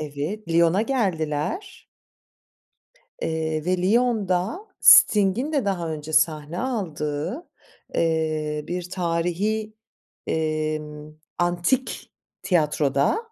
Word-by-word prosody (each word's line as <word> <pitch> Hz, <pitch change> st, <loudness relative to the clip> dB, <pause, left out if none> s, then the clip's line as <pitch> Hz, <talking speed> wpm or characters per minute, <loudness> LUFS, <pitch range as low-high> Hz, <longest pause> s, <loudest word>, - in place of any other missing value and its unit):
Evet, 155 Hz, +7 st, -5 dB
Lyon'a 170 Hz, +4 st, +3 dB
geldiler. 200 Hz, -, -2 dB, 1.4 s
Eee, 160 Hz, -1 st, -2 dB
ve 185 Hz, 0 st, +1 dB
Lyon'da 205 Hz, -, +1 dB, 0.2 s
Sting'in 210 Hz, +8 st, +6 dB
de 280 Hz, -7 st, 0 dB
daha 175 Hz, -4 st, -1 dB
önce 155 Hz, 0 st, -6 dB
sahne 155 Hz, +1 st, +1 dB
aldığı, 185 Hz, -, -3 dB, 0.5 s
eee, 155 Hz, -2 st, 0 dB
bir 180 Hz, 0 st, -4 dB
tarihî, 185 Hz, +5 st, -1 dB, 0.5 s
emm, 155 Hz, -1 st, -3 dB, 0.2 s
antik 175 Hz, +9 st, -1 dB, 0.3 s
tiyatroda. 150 Hz, -, +1 dB
170 Hz, 80 wpm, -24 LUFS, 155-210 Hz, 1.4 s, Sting'in